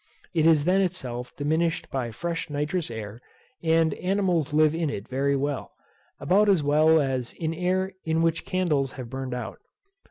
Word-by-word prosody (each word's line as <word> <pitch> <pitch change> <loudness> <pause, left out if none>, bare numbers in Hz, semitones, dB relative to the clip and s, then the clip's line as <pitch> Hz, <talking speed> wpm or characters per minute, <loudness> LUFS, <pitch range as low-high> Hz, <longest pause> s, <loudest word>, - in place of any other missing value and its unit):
It 160 -2 +3
is 155 -3 +4
then 190 +2 +3
itself 125 -10 -4
diminished 160 +3 -1
by 130 -3 -2
fresh 165 +9 -4
nitrous 150 +3 -2
air, 110 0 -7 0.4
and 160 -1 +3
animals 180 -6 0
live 155 0 +4
in 165 -2 -1
it 100 -7 -5
very 140 +2 0
well, 140 0 -2 0.5
about 195 +9 +3
as 185 -7 +4
well 155 +2 +4
as 130 -4 -1
in 160 -1 -3
air 185 +3 -1
in 160 0 +1
which 165 0 +1
candles 150 -8 0
have 125 -3 -8
burned 130 -1 -4
out. 125 - -6
155 Hz, 165 wpm, -26 LUFS, 135-170 Hz, 0.5 s, is